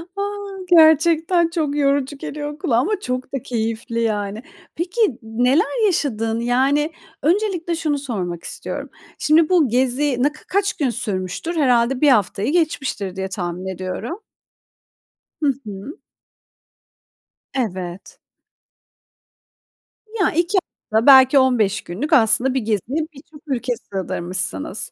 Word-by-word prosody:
A! 400 - -3 0.5
Gerçekten 330 +1 +5
çok 310 -4 -1
yorucu 280 -1 +1
geliyor 295 +1 -6
kulağa 235 -5 +1
ama 370 - +1
çok 255 -4 -4
da 270 - -2
keyifli, 230 0 -2
yani. 210 0 -2 0.3
Peki 355 - 0
neler 260 - +1
yaşadın? 230 - 0
Yani, 270 +6 +1 0.3
öncelikle 350 -1 0
şunu 310 -3 -1
sormak 190 -11 -4
istiyorum. - - -6 0.3
Şimdi 310 +2 +3
bu 345 -6 +4
gezi 255 +2 +1
ne 290 - +3
ka 300 - -17
kaç 400 +2 +1
gün 280 -4 -1
sürmüştür? 215 - -3
Herhâlde 250 -3 +2
1 300 - +6
haftayı 210 -1 +2
geçmiştir 270 - -1
diye 190 0 -3
tahmin 180 -1 -4
ediyorum. 185 - -5 1.2
Hı 280 - +3
hı. 205 +7 -8 1.5
Evet. 185 -8 -4 1.9
Ya, 430 -5 0
2 345 +5 +1 0.3
hafta, 220 +2 +2
belki 265 0 +8
15 225 -6 +2
günlük. 260 - -4
Aslında 245 0 +4
bir 265 - +1
geziye 230 - -2
birçok 295 +2 -15
ülke 250 -2 -1
sığdırmışsınız. 185 - -3
265 Hz, 120 wpm, -20 LUFS, 220-310 Hz, 1.9 s, belki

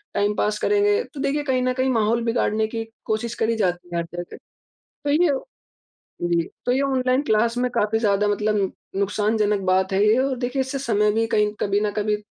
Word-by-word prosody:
Time 205 +1 +2
pass 210 0 0
करेंगे। 415 +2 +2
तो 285 - -8
देखिए, 290 +1 0
कहीं 260 -2 0
न 255 0 +1
कहीं 260 +1 0
माहौल 230 0 +1
बिगाड़ने 220 -2 +1
की 225 0 -4 0.2
कोशिश 220 +2 -2
करी 230 +1 +1
जाती 180 -3 -1
है - - -1
हर 170 - -2
तरह 175 +1 -6
से - - -10 0.5
तो 290 - -6
ये 320 +2 +4 0.9
जी, 170 -1 +2 0.2
तो 245 - +3
ये 265 - +1
ऑनलाइन 260 -1 +1
क्लास 230 -2 +1
में 250 0 0
काफ़ी 215 0 +1
ज़्यादा 205 -1 +2
मतलब 205 -1 0 0.2
नुकसानजनक 210 +1 +1
बात 190 +1 +2
है 200 +2 +3
ये, 220 +4 +4
और 265 0 +1
देखिए, 250 +2 -2
इससे 265 +1 -4
समय 210 -4 +2
भी 225 +1 +1
कहीं 210 -2 +2
कभी 200 0 +1
न 210 -1 0
कभी 210 0 +1
220 Hz, 205 wpm, -23 LUFS, 205-255 Hz, 0.9 s, ये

